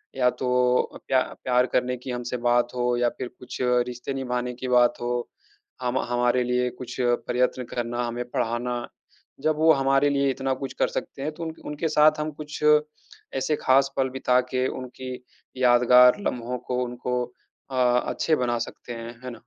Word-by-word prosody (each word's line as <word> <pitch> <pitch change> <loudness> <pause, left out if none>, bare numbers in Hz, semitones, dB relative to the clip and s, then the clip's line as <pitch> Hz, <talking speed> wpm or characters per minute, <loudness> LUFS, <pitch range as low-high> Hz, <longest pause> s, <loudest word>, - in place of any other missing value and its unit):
या 125 -1 +3
तो 125 0 +1
अ, - - -9
प्या 130 -1 +3 0.2
प्यार 125 0 +3
करने 125 0 +1
की 125 +1 -7
हमसे 125 0 -3
बात 120 0 +2
हो 125 0 +1
या 120 0 +2
फिर 130 - -4
कुछ 125 - -8 0.3
रिश्ते 125 +2 -5
निभाने 125 -2 -2
की 130 +1 -6
बात 125 -1 +4
हो, 120 0 -2 0.5
हम 125 +1 0
हमारे 120 +1 +2
लिए 125 0 +1
कुछ 125 -1 -7
प्रयत्न 125 +1 +1
करना, 120 0 -3
हमें 120 +1 -3
पढ़ाना। 120 +1 -2 0.5
जब 155 -1 +2
वो 160 +1 +5
हमारे 135 +1 +3
लिए 140 -1 +2
इतना 135 0 -1
कुछ 135 0 -6
कर - - +3
सकते 135 - -5
हैं 155 +2 -2
तो 165 - -7
उन 160 -1 -4
उनके 150 +2 -2
साथ 155 0 +4
हम 155 0 -2
कुछ 150 0 -7 0.7
ऐसे 150 +3 +1
ख़ास 135 +1 +4
पल 130 -1 +2
बिता 125 -1 +2
के 130 0 +1
उनकी 130 0 -6 0.4
यादगार 125 0 +6
लम्हों 125 +1 -3
को 125 0 0
उनको 125 0 -2 0.5
अ, - - -4 0.3
अच्छे 160 - +1
बना 120 -2 0
सकते 120 +1 -6
हैं, 115 +1 -8
है 125 - -5
ना? - - -9
125 Hz, 180 wpm, -25 LUFS, 120-130 Hz, 0.7 s, यादगार